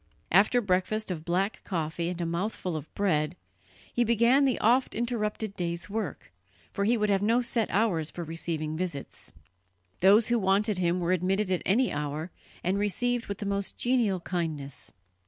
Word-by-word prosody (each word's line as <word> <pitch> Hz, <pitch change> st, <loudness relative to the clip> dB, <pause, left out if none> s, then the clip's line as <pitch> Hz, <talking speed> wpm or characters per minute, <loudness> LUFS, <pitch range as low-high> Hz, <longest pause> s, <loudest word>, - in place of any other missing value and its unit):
After 210 Hz, +7 st, +5 dB
breakfast 200 Hz, +1 st, 0 dB
of 160 Hz, -3 st, -4 dB
black 185 Hz, +5 st, -1 dB
coffee 170 Hz, -1 st, -2 dB
and 180 Hz, -1 st, -5 dB
a 170 Hz, -, -1 dB
mouthful 175 Hz, +1 st, -2 dB
of 155 Hz, 0 st, -6 dB
bread, 155 Hz, -5 st, +1 dB, 0.6 s
he 240 Hz, -, +2 dB
began 235 Hz, +4 st, +4 dB
the 260 Hz, -3 st, +2 dB
oft 245 Hz, +4 st, +2 dB
interrupted 220 Hz, -3 st, -2 dB
day's 170 Hz, +2 st, -3 dB
work, 205 Hz, -, -4 dB, 0.4 s
for 200 Hz, -, 0 dB
he 235 Hz, +3 st, +3 dB
would 210 Hz, -1 st, +1 dB
have 195 Hz, -1 st, +2 dB
no 230 Hz, +4 st, +2 dB
set 235 Hz, -2 st, 0 dB
hours 185 Hz, -7 st, +1 dB
for 175 Hz, -, -6 dB
receiving 160 Hz, -1 st, -3 dB
visits. 170 Hz, -5 st, -5 dB, 0.7 s
Those 205 Hz, +5 st, +5 dB
who 240 Hz, 0 st, +3 dB
wanted 195 Hz, +1 st, +2 dB
him 175 Hz, 0 st, +1 dB
were 175 Hz, +1 st, 0 dB
admitted 185 Hz, +2 st, +1 dB
at 180 Hz, -, +1 dB
any 235 Hz, +6 st, +3 dB
hour, 150 Hz, +3 st, -3 dB, 0.3 s
and 190 Hz, +3 st, +1 dB
received 240 Hz, +4 st, 0 dB
with 200 Hz, -, -4 dB
the 205 Hz, -, -5 dB
most 200 Hz, 0 st, -2 dB
genial 240 Hz, -7 st, +2 dB
kindness. 160 Hz, -6 st, -4 dB
195 Hz, 170 wpm, -28 LUFS, 170-220 Hz, 0.7 s, After